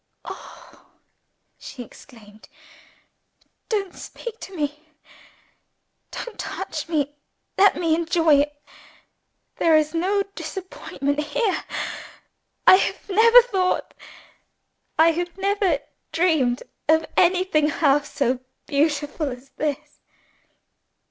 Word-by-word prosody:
"Oh!" - - -12 0.7
she 250 - -8
exclaimed, 215 -3 -16 1.2
"don't 400 -5 -1
speak 465 -2 -9
to 385 - -9
me! 300 0 -4 1.2
don't 480 -3 -7
touch - - -5
me! 290 -3 0 0.4
let 400 +1 +5
me 335 -2 +1
enjoy 330 -1 +3
it! 295 0 -1 1.0
There 320 -1 +5
is 305 0 +1
no 385 +4 +1
disappointment 295 -8 -4
here. 375 +8 -1 1.0
I 375 - +9
have - - -2
never 460 +4 +7
thought, 380 -6 -1 1.0
I 325 +1 +6
have 350 +2 -4
never 390 -4 +1 0.3
dreamed, 310 -8 +2 0.3
of 320 0 +4
anything 355 -4 +3
half 290 -1 +2
so 255 -2 0 0.3
beautiful 295 +1 0
as 250 +2 -10
_this! 300 0 -4
320 Hz, 95 wpm, -23 LUFS, 290-375 Hz, 1.2 s, I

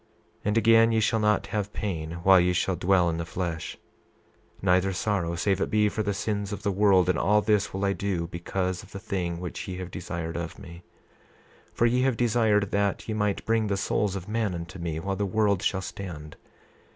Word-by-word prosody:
28:9 - - -37 0.4
And 105 +2 +1
again, 115 +1 +5
ye 110 - +2
shall 110 0 +2
not 105 -2 +2
have 105 -1 -2
pain 80 -6 -3
while 95 0 +7
ye 90 +1 +2
shall 90 +1 0
dwell 90 0 +3
in 85 -1 -1
the - - -1
flesh, 85 -1 -4 0.8
neither 95 0 +2
sorrow 90 -4 -1
save 95 +2 0
it - - 0
be 105 -1 +3
for 110 - -2
the 100 -1 -1
sins 100 0 -2
of 100 - -5
the 100 - +1
world; 95 -2 +4
and 90 -3 +1
all 105 +3 +4
this 105 -1 +1
will 95 +1 -2
I 100 - +2
do 95 -4 -2
because 90 +2 -3
of 100 - -16
the 100 - -5
thing 90 -5 -3
which 90 -1 -6
ye 90 -1 -5
have 90 -1 -6
desired 85 -2 -5
of 85 -1 -5
me, 85 0 -11 0.9
for 120 - +1
ye 125 +2 +3
have 130 -3 +1
desired 110 -4 +2
that 100 -1 0
ye 110 - -2
might 105 -2 -1
bring 115 -1 +1
the 100 -1 0
souls 100 0 0
of 95 0 -6
men 110 -3 -1
unto 85 +2 -7
me, 80 -2 -3
while 95 +3 -2
the 100 - -2
world 100 -1 +1
shall 95 - 0
stand. 85 -7 -7
95 Hz, 215 wpm, -27 LUFS, 90-105 Hz, 0.9 s, while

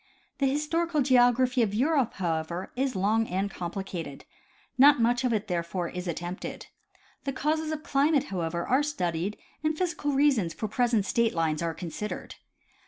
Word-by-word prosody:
The 275 - +3
historical 305 +2 0
geography 250 0 +4
of 205 -3 +1
Europe, 270 0 +2
however, 170 0 -2
is 260 0 -1
long 215 +4 +2
and 195 +2 -1
complicated. 175 -5 -6 0.5
Not 280 +2 +7
much 240 +2 +2
of 250 - +1
it 215 -2 0
therefore, 175 -1 -2
is 180 0 -6
attempted. 175 +2 -5 0.6
The 275 - -2
causes 310 +3 -1
of 310 -1 -4
climate 285 -1 +2
however, 170 -1 -2
are 260 +3 +3
studied 195 - -2 0.3
and 310 0 0
physical 330 -5 -1
reasons 270 - +2
for 215 - -3
present 230 -1 +1
state 230 0 +1
lines 160 -2 0
are 165 -1 -2
consid 185 +4 -5
ered. - - -7
230 Hz, 160 wpm, -28 LUFS, 180-275 Hz, 0.6 s, Not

